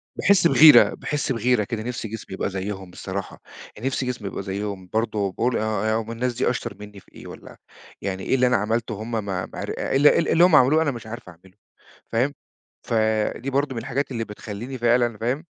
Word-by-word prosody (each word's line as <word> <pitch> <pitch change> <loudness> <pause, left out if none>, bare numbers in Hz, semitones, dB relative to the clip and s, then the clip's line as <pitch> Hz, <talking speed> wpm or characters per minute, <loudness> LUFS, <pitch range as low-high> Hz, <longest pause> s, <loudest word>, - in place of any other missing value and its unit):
باحِس 185 -4 +4
بغيرة، 150 +1 +8
باحِس 150 -2 -3
بغيرة 120 -2 +2
كده، 110 0 -4
نفسي 120 -1 -4
جسمي 110 -2 -8
يبقى 95 - -2
زيهم 95 -1 -5
بصراحة، 95 +2 -6 0.3
يعني 115 +5 -4
نفسي 135 0 -1
جسمي 125 -5 -4
يبقى 95 - -5
زيهم 95 -1 -5
برضه، 110 -3 0
باقول 120 +6 0
آه، 110 -1 -1
آه، - - -1
هُم 115 +1 -8
الناس 120 +2 -2
دي 120 - 0
أشطر 120 -3 -4
منّي 105 -1 -11
في - - -24
إيه - - -11
والّا - - -12 0.4
يعني 95 -1 -4
إيه 130 - +1
اللي 125 -1 +3
أنا 125 -1 +3
عملته 110 +2 -1
وهُم 110 +3 -7
ما 115 -1 -1
ما 95 -3 -4
عر - - -5
إيه - - -2
ال 145 +2 +6
إيه 165 - +3
اللي 170 - +5
هُم 180 -3 +6
عملوه 150 +3 +5
أنا 155 -3 +1
مش 120 -3 -9
عارف 115 -3 -8
أعمله؟ 90 +2 -18 0.6
فاهم؟ 125 +5 +1 0.5
فدي 110 +3 0
برضه 140 0 0
من 115 - -3
الحاجات 135 +3 -3
اللي 115 -3 -2
بتخلّيني 110 +4 -7
فعلًا 120 -1 +2
فاهم، 125 +8 -2
115 Hz, 210 wpm, -23 LUFS, 105-125 Hz, 0.6 s, بغيرة